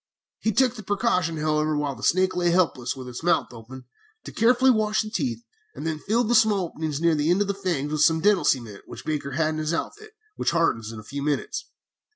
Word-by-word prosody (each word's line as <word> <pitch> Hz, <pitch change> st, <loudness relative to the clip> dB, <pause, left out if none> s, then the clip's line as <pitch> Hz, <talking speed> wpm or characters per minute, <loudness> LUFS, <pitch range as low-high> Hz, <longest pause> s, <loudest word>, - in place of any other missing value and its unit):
"He 220 Hz, -, 0 dB
took 250 Hz, +3 st, +3 dB
the 225 Hz, -, -9 dB
precaution, 185 Hz, -5 st, 0 dB
however, 155 Hz, 0 st, 0 dB
while 145 Hz, -1 st, -1 dB
the 115 Hz, -, -12 dB
snake 185 Hz, +1 st, +2 dB
lay 175 Hz, -1 st, +1 dB
helpless 155 Hz, -8 st, +1 dB
with 130 Hz, -1 st, -8 dB
its 125 Hz, -1 st, -7 dB
mouth 175 Hz, +1 st, +1 dB
open, 125 Hz, +3 st, -11 dB, 0.4 s
to -, -, -8 dB
carefully 250 Hz, +3 st, +4 dB
wash 215 Hz, -2 st, +1 dB
the 215 Hz, -, -8 dB
teeth, 240 Hz, 0 st, -2 dB, 0.3 s
and -, -, -7 dB
then 160 Hz, -1 st, -2 dB
filled 225 Hz, +7 st, 0 dB
the 240 Hz, -, +2 dB
small 215 Hz, -5 st, +4 dB
openings 155 Hz, -3 st, -4 dB
near 170 Hz, 0 st, +3 dB
the 150 Hz, +1 st, 0 dB
end 180 Hz, +3 st, +3 dB
of 205 Hz, -, +1 dB
the 200 Hz, -, 0 dB
fangs 175 Hz, -7 st, -2 dB
with 155 Hz, -1 st, -1 dB
some 160 Hz, +1 st, +4 dB
dental 205 Hz, +1 st, +3 dB
cement 115 Hz, -6 st, 0 dB
which -, -, -10 dB
Baker 145 Hz, -3 st, -3 dB
had 155 Hz, +2 st, +1 dB
in 155 Hz, -, -3 dB
his 155 Hz, +2 st, -1 dB
outfit, 430 Hz, -, -6 dB, 0.2 s
which -, -, +1 dB
hardens 115 Hz, -10 st, 0 dB
in 110 Hz, -, -8 dB
a -, -, -11 dB
few 140 Hz, +6 st, -6 dB
minutes. 145 Hz, 0 st, -2 dB
165 Hz, 230 wpm, -25 LUFS, 145-210 Hz, 0.4 s, carefully